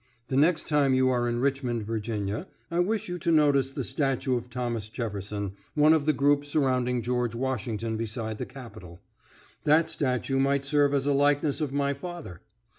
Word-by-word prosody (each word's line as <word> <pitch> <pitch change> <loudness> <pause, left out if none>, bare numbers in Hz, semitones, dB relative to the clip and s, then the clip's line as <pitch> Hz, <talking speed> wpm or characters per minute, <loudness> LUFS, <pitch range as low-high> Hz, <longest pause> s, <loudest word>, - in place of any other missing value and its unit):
The 130 - -1
next 155 +4 +3
time 145 -3 +3
you 130 0 +3
are 120 -1 +1
in 120 0 -1
Richmond, 130 -4 0
Virginia, 110 -2 -3 0.2
I 170 - 0
wish 210 +4 0
you 180 0 -4
to 170 - 0
notice 145 -4 +4
the - - -4
statue 135 -2 0
of 120 0 -4
Thomas 120 -4 -3
Jefferson, 105 -3 -4 0.2
one 150 +1 +6
of 155 -2 +1
the - - +6
group 145 +1 +3
surrounding 130 -4 0
George 120 -1 -1
Washington 115 -3 -2
beside 110 -1 -4
the - - -4
Capitol. 115 -10 -11 0.6
That 155 +2 +4
statue 135 0 -1
might 140 0 +1
serve 145 0 +3
as 135 -1 0
a 145 - +2
likeness 145 +2 +2
of 150 -3 -1
my 140 0 0
father. 145 - -8
130 Hz, 180 wpm, -27 LUFS, 115-145 Hz, 0.6 s, one